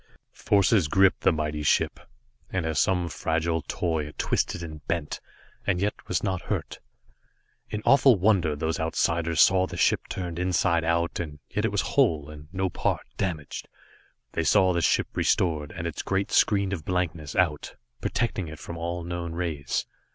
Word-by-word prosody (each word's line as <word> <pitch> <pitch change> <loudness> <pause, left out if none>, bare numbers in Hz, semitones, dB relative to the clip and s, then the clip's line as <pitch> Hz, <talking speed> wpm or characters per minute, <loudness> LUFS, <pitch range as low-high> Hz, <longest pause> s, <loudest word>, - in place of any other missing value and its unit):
Forces 100 -3 +3
gripped 95 +2 +4
the - - +4
mighty 75 -1 -2
ship, 75 - +2 0.5
and 90 -3 -2
as 80 -2 0
some 90 -2 +2
fragile 80 +1 -1
toy 80 -1 -2
it 75 - -12
twisted 85 - 0
and 80 -3 -8
bent, 85 -3 -2 0.5
and 95 -3 +2
yet 100 +2 -2
was 90 - -1
not 95 -3 -1
hurt. - - -4 0.9
In 105 0 -4
awful 135 -4 +6
wonder 90 -6 +2
those 80 +2 -2
Outsiders 85 0 0
saw 95 0 +5
the - - -7
ship - - +2
turned 90 -3 -4
inside 90 -1 +2
out, 85 +1 0
and 75 -4 -5
yet - - 0
it - - 0
was - - +1
whole, 75 -2 +1
and 75 0 -11
no 95 0 0
part 90 - -1
damaged. 80 -7 -3 0.6
They - - -1
saw 95 -1 +4
the 85 - 0
ship 80 - +3
restored, 75 -5 +1
and 85 -1 -6
its 85 - -3
great 95 0 -1
screen 100 -2 +3
of 85 -6 -4
blankness 85 -4 -2
out, 85 -6 0 0.3
protecting 105 -7 -1
it 80 0 -8
from 85 - -8
all 85 +1 -3
known 85 -1 -4
rays. 80 -5 -2
85 Hz, 170 wpm, -26 LUFS, 80-95 Hz, 0.9 s, awful